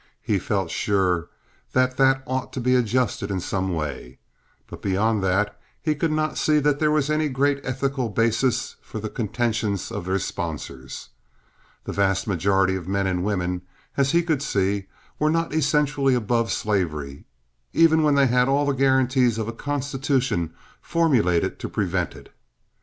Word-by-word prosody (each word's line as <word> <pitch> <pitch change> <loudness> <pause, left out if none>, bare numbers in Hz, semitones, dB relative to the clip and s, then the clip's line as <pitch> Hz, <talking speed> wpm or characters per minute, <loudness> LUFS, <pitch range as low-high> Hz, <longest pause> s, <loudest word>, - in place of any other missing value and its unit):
He 100 -3 +1
felt 95 -2 -1
sure 90 -4 +1 0.4
that 130 0 +2
that 135 0 +3
ought 130 0 -3
to - - -3
be 125 +1 +2
adjusted 125 -4 +1
in 95 -2 -1
some 95 +1 -2
way; 70 -5 -5 0.5
but - - -11
beyond 100 +2 +1
that 95 +3 0 0.2
he 155 - 0
could 155 +2 -1
not 155 0 -1
see 155 -1 +3
that 145 -1 +2
there 155 - +3
was 150 -1 +1
any 155 0 +1
great 140 +1 +1
ethical 135 -1 -1
basis 115 +4 0
for - - -9
the 110 0 -5
contentions 110 -3 -1
of - - -5
their 95 +1 +1
sponsors. 75 -8 -5 0.7
The - - -5
vast 95 -1 +1
majority 95 0 +2
of 90 -2 -6
men 100 0 0
and 90 -1 0
women, 90 -3 -1 0.3
as 140 -1 +2
he 170 0 +3
could 160 -5 0
see, 100 -6 0 0.3
were 155 - +3
not 165 -1 0
essentially 145 -3 +2
above 115 0 0
slavery, 75 -9 -2 0.5
even 160 -1 +5
when 150 -2 +3
they 140 -1 +5
had 125 0 +3
all 140 +1 +2
the 140 - +2
guarantees 130 -3 +3
of 110 -1 -2
a 115 - -4
constitution 135 - -1 0.3
formulated 125 - +1
to - - -5
prevent - - -1
it. - - -15
120 Hz, 165 wpm, -24 LUFS, 95-140 Hz, 0.7 s, even